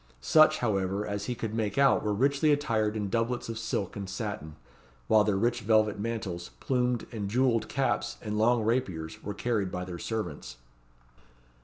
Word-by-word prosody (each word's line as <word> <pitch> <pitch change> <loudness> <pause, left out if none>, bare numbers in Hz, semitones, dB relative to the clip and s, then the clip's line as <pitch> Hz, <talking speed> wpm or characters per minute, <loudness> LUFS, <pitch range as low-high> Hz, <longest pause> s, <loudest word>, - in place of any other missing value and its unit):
Such, 155 - +5
however, 100 -3 0
as 100 -1 -3
he 125 - -2
could 115 -2 -4
make 110 -1 -2
out 140 0 +5
were 105 - 0
richly 140 +7 +2
attired 110 -7 +1
in 105 -1 -2
doublets 115 +3 -1
of 115 -1 -4
silk 110 -3 -3
and 100 -2 -5
satin, 95 -6 -5 0.5
while 105 - +5
their 105 -2 +1
rich 120 +4 +1
velvet 110 -1 +2
mantles, 105 -6 -4
plumed 125 -3 0
and 105 -4 -4
jewelled 120 0 +1
caps, 135 0 -1
and 105 -2 -4
long 115 +2 +3
rapiers, 95 -9 -2
were 105 0 -5
carried 105 -4 -1
by 90 0 -4
their 90 -2 -7
servants. 85 - -4
110 Hz, 170 wpm, -29 LUFS, 100-120 Hz, 0.5 s, Such